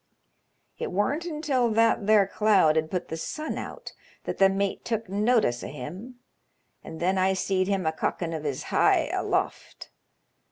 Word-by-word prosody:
It - - -3
worn't 240 - 0
until 300 -7 0
tbat 225 -2 +2
there 215 -2 +5
cloud 195 -6 +3
had 160 0 0
put 180 0 -3
the 160 - -4
sun 305 - -4
out - - -8 0.3
that - - -5
the 195 0 +6
mate 195 0 -2
took 225 -2 -3
notice 205 - +1
o' - - -5
him, 175 - -8 0.7
and 160 - -9
then 185 +2 +1
I 190 +1 +3
seed 185 0 0
him 195 -3 0
a 160 - +2
cockin' 165 +1 -3
of 155 -2 -4
his 140 -4 -3
hye - - +3
aloft. - - -3
195 Hz, 165 wpm, -26 LUFS, 165-225 Hz, 0.7 s, the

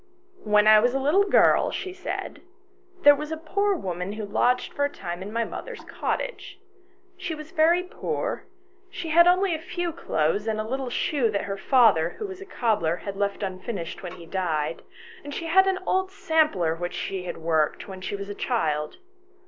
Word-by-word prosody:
" 375 0 -28
When 210 0 +6
I 215 0 +8
was 245 +4 +2
a - - +2
little 310 +9 +3
girl," 395 - +4
she 370 - -5
said, 365 -1 -5 0.3
" 370 -1 -31
there 290 - +9
was 300 +2 -5
a 320 - -2
poor 400 +6 0
woman 180 - -4
who 215 0 -5
lodged 250 +5 +1
for 285 - -1
a 285 - +2
time 175 -8 -6
in 200 +2 -6
my 230 +1 0
mother's 475 - -7
cottage. - - -4 0.6
She 360 -3 -4
was 305 +1 -10
very 335 +3 +3
poor; 360 - -4 0.4
she 345 -3 -6
had 340 +2 +6
only 365 +1 +4
a 315 - -2
few 350 +1 -3
clothes 200 - 0
and 215 -1 -1
a 215 - -3
little 265 +1 -3
shoe 250 -1 0
that 200 -1 -1
her 195 - -3
father, 200 - +3
who 430 - -4
was 380 -1 -8
a 390 - -9
cobbler, 210 - 0
had 195 +2 -7
left 200 +1 -2
unfinished 185 -2 -5
when 180 -2 -7
he 175 -2 -11
died, 165 -4 -2 0.4
and 290 0 -7
she 335 - -4
had 380 +4 +5
an 380 -1 +2
old 375 0 +1
sampler 310 - +1
which 175 +1 -5
she 190 -2 -4
had - - -5
worked 160 -2 0
when 190 -1 -8
she 195 - -3
was 200 0 -6
a 205 - -5
child. 155 - -1
240 Hz, 205 wpm, -25 LUFS, -, 0.6 s, there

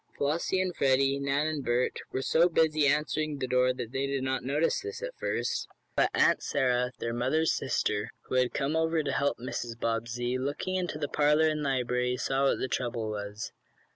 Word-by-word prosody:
Flossie 160 +6 0
and 185 -2 -1
Freddie, 135 0 +3
Nan 140 +2 +1
and 155 -3 -2
Bert, 120 +1 0
were 130 - -2
so 170 +5 +4
busy 155 -3 +3
answering 150 +1 0
the 135 - -2
door 125 0 +3
that 120 -2 -5
they 135 +1 -1
did 140 -1 -2
not 130 0 -1
notice 145 +5 +1
this 420 +4 -6
at - - -5
first. - - -2 0.3
But - - +3
Aunt - - +4
Sarah, 125 -2 +1
their 115 - -3
mother's 135 +7 +1
sister, 105 -4 -1
who - - -9
had 125 -1 +3
come 140 +2 -1
over 160 0 +1
to 140 - -1
help 140 +1 +1
Mrs. 120 -1 -5
Bobbsey, 115 +2 -1
looking 145 +8 -2
in 185 -1 0
the 150 -3 -3
parlor 150 +2 +3
and 155 -1 0
library, 125 -2 0
saw 135 +2 +1
what - - +3
the - - -2
trouble 120 -4 -2
was. 105 0 -5
135 Hz, 195 wpm, -29 LUFS, 125-155 Hz, 0.3 s, so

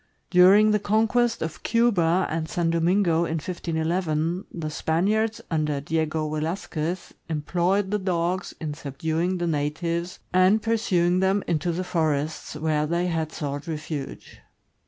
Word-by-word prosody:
During 195 +4 +7
the 210 - +3
conquest 225 +3 +1
of 160 -1 -5
Cuba 190 -7 +2
and 160 0 -3
San 170 -1 0
Domingo, 170 +1 +2
in 165 - -2
1511, 165 +1 -1
the 155 -3 -5
Spaniards 210 +9 0
under 150 -3 0
Diego 155 +1 -1
Velasquez 160 +2 -3 0.2
employed 180 +5 0
the 210 - +1
dogs 180 -1 -1
in 155 -3 -4
subduing 160 +5 -2
the 175 - -1
natives 165 +3 -2 0.2
and 185 +4 +5
pursuing 190 -6 +1
them 190 +1 +2
into 170 0 0
the 175 +2 -2
forests, 155 -4 -1
where 150 0 0
they 170 +2 0
had 165 -3 -1
sought 145 +1 -5
refuge. 150 -2 -6
170 Hz, 135 wpm, -25 LUFS, 155-185 Hz, 0.2 s, During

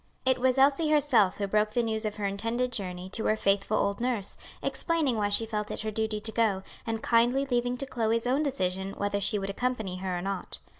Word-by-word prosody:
It 260 -1 +3
was 255 +1 +2
Elsie 280 +4 +4
herself 265 -11 +4
who 205 - -1
broke 210 +2 +1
the 240 - +2
news 220 -1 -1
of 210 - -2
her 210 - -3
intended 230 +5 -1
journey 185 -5 -4
to 220 - +1
her 215 - +3
faithful 200 0 +1
old 200 +2 0
nurse, 240 -6 -1 0.3
explaining 320 -7 0
why 205 -2 0
she 205 +2 +3
felt 210 -1 -3
it - - -3
her 215 0 -3
duty 220 0 -1
to 220 +1 -2
go, 210 -4 +1 0.2
and 225 -1 -2
kindly 240 +4 +3
leaving 245 -1 0
to 275 - -4
Chloe's 230 -3 0
own 260 +4 +2
decision 190 -9 -1
whether 200 0 -1
she 205 +1 +2
would 195 0 -3
accompany 220 -5 -2
her 185 -1 -3
or - - -3
not. 195 -1 -4
220 Hz, 220 wpm, -28 LUFS, 200-250 Hz, 0.3 s, Elsie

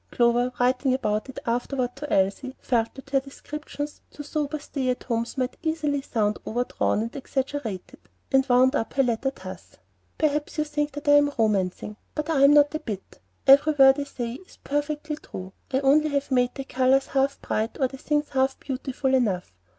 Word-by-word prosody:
Clover, 240 +1 +2
writing 255 +1 +2
about 215 -2 -1
it 260 - -10
afterward 245 +1 -1
to 295 +1 -6
Elsie, 200 +8 +1
felt 230 -3 0
that 275 0 -12
her 275 - +4
descriptions 290 +2 -7
to 295 - -9
sober 300 0 -2
stay 275 -3 -3
at 250 - -1
homes 235 +1 -2
might 255 -1 -2
easily 310 -3 -1
sound 215 -5 -1
overdrawn 235 -2 0
and 230 - -6
exaggerated, 265 -7 -4 0.3
and 270 -1 +5
wound 255 +2 +5
up 225 - -2
her 270 - +3
letter 245 +2 0
thus: 185 -7 -10 0.4
"Perhaps 300 0 0
you 305 - +2
think 295 -1 -2
that 290 +1 -8
I 290 0 +7
am 290 0 +3
romancing; 210 -1 0 0.2
but 300 +1 -2
I 275 -3 +3
am 285 - +7
not 290 0 +5
a 310 - -1
bit. 205 -8 -7 0.3
Every 285 +3 +7
word 270 -1 +6
I 285 - -2
say 240 -4 -5
is - - -20
perfectly 295 +1 -2
true, 185 -9 -9 0.2
only 275 +3 +4
I 295 - -4
have 280 0 -1
not - - +3
made 250 0 +2
the 270 - -4
colors 265 +1 +2
half 275 +1 0
bright 220 +2 -2
or 265 - +3
the 270 - -10
things 295 +2 -1
half 265 0 0
beautiful 265 0 -2
enough. 205 - +1
270 Hz, 190 wpm, -25 LUFS, 245-290 Hz, 0.4 s, I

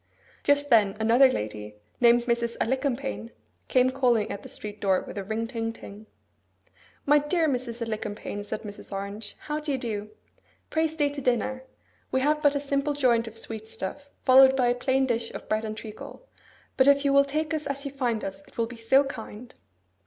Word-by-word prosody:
Just 285 0 +2
then 210 -3 +4
another 235 +5 +6
lady, 105 - -4 0.2
named 240 0 +5
Mrs. 235 -1 -1
Alicumpaine, 265 -1 -1 0.4
came 255 0 +3
calling 245 -5 +2
at 200 - -5
the - - -11
street 210 0 -8
door 190 -2 +2
with - - -9
a 200 - -3
ring 220 +3 -2
ting 230 -1 -3
ting. 215 -1 -12 1.0
'My 295 +1 +5
dear 320 +3 +1
Mrs. 245 -4 -2
Alicumpaine,' 210 -2 -4
said 210 - -5
Mrs. 205 -1 -9
Orange, 200 +2 -5
'how 300 0 -3
do 300 -1 -3
you 270 - 0
do? 215 -4 -4 0.6
Pray 320 0 +2
stay 305 -2 0
to 285 0 -6
dinner. 255 +1 0 0.5
We 260 - +1
have 300 +2 +2
but 290 -1 +4
a - - +1
simple 280 +1 -1
joint 240 -5 +2
of 225 0 -9
sweet 220 -1 -6
stuff, 280 +8 -7 0.2
followed 265 0 +8
by 250 -2 +3
a - - +4
plain 260 +2 +1
dish 235 -2 -1
of - - -8
bread 215 +1 0
and 215 0 -5
treacle; 220 - -10 0.5
but, 260 - +5
if 280 0 +5
you 280 - +3
will 280 0 +7
take 305 +3 -2
us 305 -2 -2
as 280 0 -3
you 280 - -3
find 245 -5 -1
us, 195 0 -5
it - - -21
will 230 - +2
be 235 +1 -10
so 245 +5 +4
kind! 245 -3 -8
245 Hz, 195 wpm, -27 LUFS, 220-280 Hz, 1.0 s, followed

